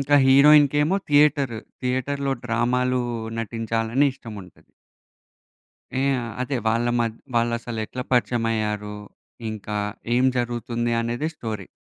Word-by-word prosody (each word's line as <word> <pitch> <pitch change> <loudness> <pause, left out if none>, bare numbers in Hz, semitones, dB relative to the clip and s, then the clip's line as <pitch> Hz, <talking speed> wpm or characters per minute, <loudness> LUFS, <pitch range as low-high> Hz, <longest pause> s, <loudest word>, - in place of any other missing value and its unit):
ఇంకా 145 +1 +3
హీరోయిన్‌కేమో 145 +4 +6
థియేటర్, 145 -4 +3 0.3
థియేటర్‌లో 135 +2 -1
డ్రామాలు 125 +2 +1 0.4
నటించాలని 115 +4 0
ఇష్టం 115 -5 -10
ఉంటది. 90 - -18 1.3
ఇయ 135 +1 +2 0.3
అదే 130 0 -1
వాళ్ళ 115 +2 +1
మధ్ 115 -1 0 0.2
వాళ్ళు 115 0 +2
అసలెట్లా 120 +1 -5
పరిచయమయ్యారు? 110 -4 0 0.5
ఇంకా 105 -1 -5 0.4
ఏం 125 - +3
జరుగుతుంది 120 0 -2
అనేదే 120 +7 -2
స్టోరీ. 110 - -5
120 Hz, 100 wpm, -23 LUFS, 115-135 Hz, 1.3 s, హీరోయిన్‌కేమో